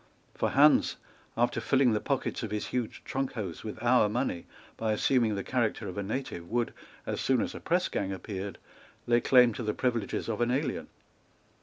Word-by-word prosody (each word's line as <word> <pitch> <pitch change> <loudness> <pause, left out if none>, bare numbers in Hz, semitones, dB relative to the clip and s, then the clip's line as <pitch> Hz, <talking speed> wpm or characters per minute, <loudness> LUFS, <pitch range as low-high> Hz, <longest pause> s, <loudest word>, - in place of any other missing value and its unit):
For - - 0
Hans, 145 +3 +5 0.4
after 120 0 +1
filling 130 +2 +3
the 105 - +1
pockets 140 +3 -2
of 115 - -3
his 105 0 -2
huge 125 -3 -3
trunk 135 0 -2
hose 95 -8 -5
with 110 - -6
our 120 -3 +4
money 110 -6 -2 0.3
by 110 -1 0
assuming 115 -1 +2
the 100 - -3
character 120 -4 -1
of 90 - -6
a 100 - -2
native, 100 -5 -4
would, 120 0 0 0.3
as - - -3
soon 130 -2 +2
as - - -2
a - - -7
pressgang 170 - 0
appeared, 95 0 -5 0.5
lay 120 0 +3
claim 125 -2 +6
to 125 - -5
the 105 -2 -1
privileges 120 -5 -1
of 115 0 -2
an 120 - +2
alien. 130 +1 -1
120 Hz, 185 wpm, -29 LUFS, 105-130 Hz, 0.5 s, claim